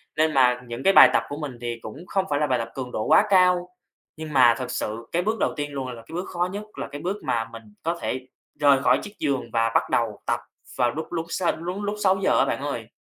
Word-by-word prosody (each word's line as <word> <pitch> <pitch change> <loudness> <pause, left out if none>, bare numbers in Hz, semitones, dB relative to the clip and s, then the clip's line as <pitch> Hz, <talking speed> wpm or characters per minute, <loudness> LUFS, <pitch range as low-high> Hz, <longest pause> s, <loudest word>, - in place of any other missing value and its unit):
Nên 155 0 +2
mà 125 -2 +4
những 120 0 -6
cái 195 0 +5
bài - - +10
tập - - +3
của 145 - -5
mình 145 -5 -6
thì 120 -1 -4
cũng 145 +11 -9
không 190 +1 0
phải 145 - +1
là 150 - +1
bài 125 -3 +1
tập 115 - -4
cường 130 -2 -5
độ 110 - -2
quá - - +5
cao. 180 -2 +4 0.5
Nhưng 155 -1 -7
mà 120 -3 +6
thực 125 - -4
sự 115 +2 -4
cái 175 - +1
bước 220 +2 -1
đầu - - +1
tiên 145 -1 -4
luôn 135 -2 -4
là 120 -2 -7
cái - - -12
bước 180 - -3
khó 175 0 -1
nhất, 205 +2 -5
là - - -4
cái 145 - -8
bước 190 +5 -2
mà 120 -5 0
mình 115 0 -10 0.2
có 170 +1 -1
thể 130 0 -3 0.3
rời 140 -2 +5
khỏi - - +4
chiếc 205 - -9
giường 135 -6 -1
và 115 0 +2
bắt - - +2
đầu 115 -3 0
tập - - 0 0.4
vào 120 -2 +2
lúc 160 +6 -6
lúc 165 -1 -2
sáu 175 0 0
lúc 180 +4 -5
lúc 205 +1 -2
6:00 190 0 +3
á, - - +4
bạn - - -2
ơi. - - -4
145 Hz, 270 wpm, -24 LUFS, 125-180 Hz, 0.5 s, bài